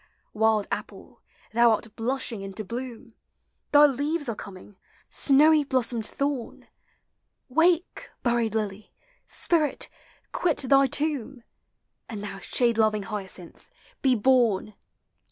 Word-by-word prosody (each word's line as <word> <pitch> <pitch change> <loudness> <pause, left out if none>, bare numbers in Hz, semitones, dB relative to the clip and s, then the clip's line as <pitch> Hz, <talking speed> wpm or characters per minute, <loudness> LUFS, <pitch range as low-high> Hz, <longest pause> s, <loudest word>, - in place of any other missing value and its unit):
Wild 220 -1 +2
apple, - - -7 0.3
thou 235 +1 +5
art 220 0 -5
blushing 235 -2 -2
into 195 +2 -6
bloom! 240 +2 -7 0.6
Thy 295 0 +8
leaves 290 +2 -1
are 230 - -2
coming, 200 0 -11 0.4
snowv 295 +1 +4
blossomed 240 -4 0
thorn! 280 -4 -4 0.8
Wake, 335 +5 +1
buried 235 -3 0
lily! 210 -1 -4 0.4
spirit, 315 -4 0 0.4
quit 340 -4 0
thy 275 +1 +4
tomb! 275 -3 -2 0.7
And 210 -3 -6
thou 200 -1 -6
shade 235 +2 +1
loving 215 -2 +2
hyacinth, 195 -4 -8 0.3
be 260 -2 +3
born 225 -3 +2
240 Hz, 110 wpm, -26 LUFS, 215-275 Hz, 0.8 s, Thy